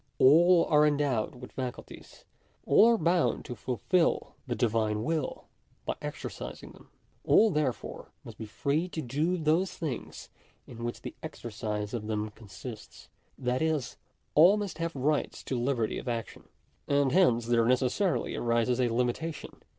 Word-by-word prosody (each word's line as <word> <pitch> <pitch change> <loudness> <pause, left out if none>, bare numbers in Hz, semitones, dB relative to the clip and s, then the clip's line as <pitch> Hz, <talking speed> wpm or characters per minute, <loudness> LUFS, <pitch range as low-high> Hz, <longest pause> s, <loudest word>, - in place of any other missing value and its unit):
All 170 +5 +6
are 150 -1 +4
endowed 140 -7 0
with 125 0 -11
faculties. 125 -2 -8 0.4
All 225 - +6
are 235 - +4
bound 170 0 +1
to 125 - -5
fulfil 125 - 0
the 120 - -1
Divine 110 -2 0
will 155 0 -2 0.4
by - - -1
exercising - - -7
them. - - -18 0.3
All 220 0 +5
therefore 150 -6 -2
must - - -11
be 110 - -6
free 150 +10 -1
to 160 - -4
do 150 +9 0
those 165 +4 +1
things 150 -8 -6 0.4
in 115 -1 -9
which 120 0 -5
the - - -6
exercise 105 0 -5
of 110 -3 -4
them 105 -1 -2
consists. 110 +2 -11 0.3
Tj^tfis, 135 +3 -1 0.4
all 175 +7 +7
must 200 -6 -4
have 165 -1 -2
rights 145 +3 -1
to 130 - -2
liberty 120 -4 0
of - - -10
action. 115 -2 -4 0.4
And 140 -2 +2
hence 125 -10 +4
there 115 -1 +3
necessarily 130 - +1
arises 120 +1 +1
a 125 - +2
limitation. 125 +7 -3
130 Hz, 145 wpm, -29 LUFS, 120-160 Hz, 0.4 s, all